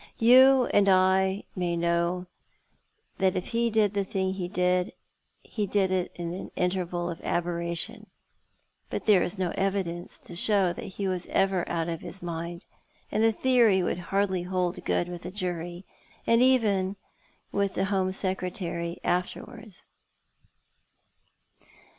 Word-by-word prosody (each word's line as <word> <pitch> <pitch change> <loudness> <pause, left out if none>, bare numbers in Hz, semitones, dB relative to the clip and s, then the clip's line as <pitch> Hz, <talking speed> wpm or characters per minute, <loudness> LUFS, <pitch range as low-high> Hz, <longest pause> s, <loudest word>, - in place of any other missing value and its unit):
You 255 +2 +7
and 200 -1 +5
I 190 +1 +3
may 175 -2 -1
know 170 +1 0 0.9
that 190 -1 +2
if 180 - -3
he 235 0 +1
did 215 -2 +2
the 200 - +1
Ihing 190 0 -1 1.1
he 210 -3 -3
did 195 -1 +1
it 185 -1 0
in 170 -1 -4
an 185 - -6
interval 180 -1 -1
of 165 - -8
aberration; 170 -1 -2 0.8
but - - -4
there 205 -4 +5
is 185 - -1
no 185 -2 -1
evidence 190 -3 -2
to 175 - -9
show 190 -1 +2
that - - -7
he 200 - -1
was 185 -2 -2
ever 195 -2 +1
out 165 -1 -1
of 165 -1 -4
his 180 +1 -9
mind, 170 +1 -5 0.5
and 215 - +1
the 225 - +5
theory 230 -6 +3
would 175 - -1
hardly 195 -2 +1
hold 180 0 -2
good 175 - +1
with 175 -1 -7
a 180 - -5
jury, 175 -1 -4 0.4
or - - +3
even 220 -6 +3 0.6
with 200 -1 0
the 190 - +1
Home 190 -1 0
Secretary 180 -3 -3
afterwards." 200 +3 -3
185 Hz, 140 wpm, -27 LUFS, 175-200 Hz, 1.1 s, You